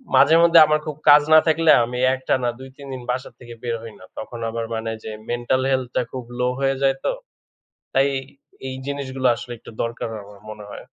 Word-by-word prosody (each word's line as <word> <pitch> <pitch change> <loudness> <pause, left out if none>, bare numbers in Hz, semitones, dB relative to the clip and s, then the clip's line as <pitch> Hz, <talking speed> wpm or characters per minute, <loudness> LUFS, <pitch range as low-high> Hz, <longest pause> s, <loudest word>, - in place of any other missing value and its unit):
মাঝে-মধ্যে 165 +1 +6
আমার 155 0 +2
খুব 150 -2 -4
কাজ 145 0 +9
না 155 - +10
থাকলে, 160 0 +4
আমি 125 +1 -5 0.2
একটানা 130 -1 -1
২-৩ 135 +1 -12
দিন 130 - -6
বাসা 125 +1 -4
থেকে 120 -1 -11
বের 120 -1 -1
হই 115 -2 -9
না। 95 - -13
তখন 115 +1 -7
আবার 115 0 -3
মানে 115 0 -3
যে 110 - -6 0.2
মেন্টাল 120 +2 0
হেলথটা 130 -1 0
খুব 130 -2 -6 0.2
লো 125 - +2
হয়ে 135 0 +1
যায় 135 0 +3
তো। - - +1 0.8
তাই 135 +1 +4 0.6
এই 130 - -5
জিনিসগুলো 135 -2 -2
আসলে 120 +1 -8
একটু - - -13
দরকার, 115 0 -4
আমার 100 0 -15
মনে 105 -1 -10
হয়। - - -9
130 Hz, 190 wpm, -22 LUFS, 120-140 Hz, 0.8 s, না